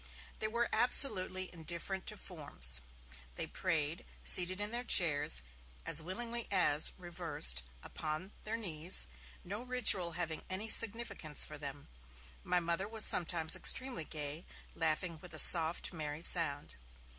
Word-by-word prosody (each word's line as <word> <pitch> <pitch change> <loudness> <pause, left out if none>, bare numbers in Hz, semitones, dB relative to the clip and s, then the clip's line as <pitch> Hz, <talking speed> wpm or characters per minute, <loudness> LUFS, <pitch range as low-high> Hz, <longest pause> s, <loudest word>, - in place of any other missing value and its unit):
They 215 - -2
were 235 +2 -3
absolutely 185 -8 +4
indifferent 175 +3 -8
to 215 - -5
forms. 140 - +1 0.5
They - - -4
prayed, 165 -3 -4 0.2
seated 185 +1 +5
in 205 +1 -3
their 240 +1 -2
chairs, 145 - +3 0.4
as - - +2
willingly 230 +7 -4
as, 165 -6 +1
reversed, 170 - -1 0.2
upon 155 +5 -8
their 220 +1 -6
knees; 175 -4 -2 0.4
no 200 +5 -5
ritual 235 -9 +2
having 165 -2 -6
any 195 +4 -5
significance 220 -9 +2
for 150 -1 -11
them. 140 -1 -9 0.6
My 180 - -1
Mother 170 +3 -4
was 220 0 +2
sometimes 165 -2 +1
extremely 255 -10 +3
gay, 150 +1 -8 0.3
laughing 165 +1 -3
with 180 - -12
a - - -7
soft, 165 +1 +5
merry 155 -1 -7
sound. 145 - -1
175 Hz, 135 wpm, -31 LUFS, 155-200 Hz, 0.6 s, seated